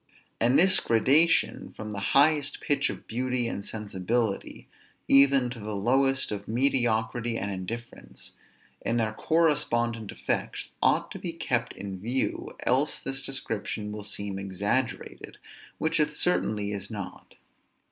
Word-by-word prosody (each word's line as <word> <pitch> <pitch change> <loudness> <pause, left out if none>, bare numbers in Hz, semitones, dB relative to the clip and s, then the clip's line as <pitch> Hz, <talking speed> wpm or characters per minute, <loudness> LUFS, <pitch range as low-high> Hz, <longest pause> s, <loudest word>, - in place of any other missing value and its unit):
And 120 +3 +4
this 185 +2 +6
gradation 140 +9 +3
from 110 0 -6
the 100 - -4 0.2
highest 145 0 +3
pitch 140 -1 +1
of - - -7
beauty 125 0 -1
and 100 - -4
sensibility, 105 +1 -2 0.4
even 135 -2 +6
to 125 - -7
the 105 0 -4
lowest 135 +6 +2
of 100 -1 -5
mediocrity 120 -1 +1
and 100 -1 -3
indifference, 110 +6 -7 0.5
and 120 +1 0
their 110 -1 0
correspondent 120 -8 +1
effects, - - -3
ought - - +2
to - - -6
be - - -4
kept - - -1
in 95 -2 -7
view, 120 +7 -2
else 135 +4 +2
this 135 0 -3
description 110 -5 -3
will 105 0 -6
seem 100 -1 -4
exaggerated, 100 +6 -2 0.4
which 160 +1 0
it 150 0 +1
certainly 105 -12 0
is 100 -1 -5
not. 100 -4 -8
115 Hz, 135 wpm, -27 LUFS, 105-135 Hz, 0.5 s, this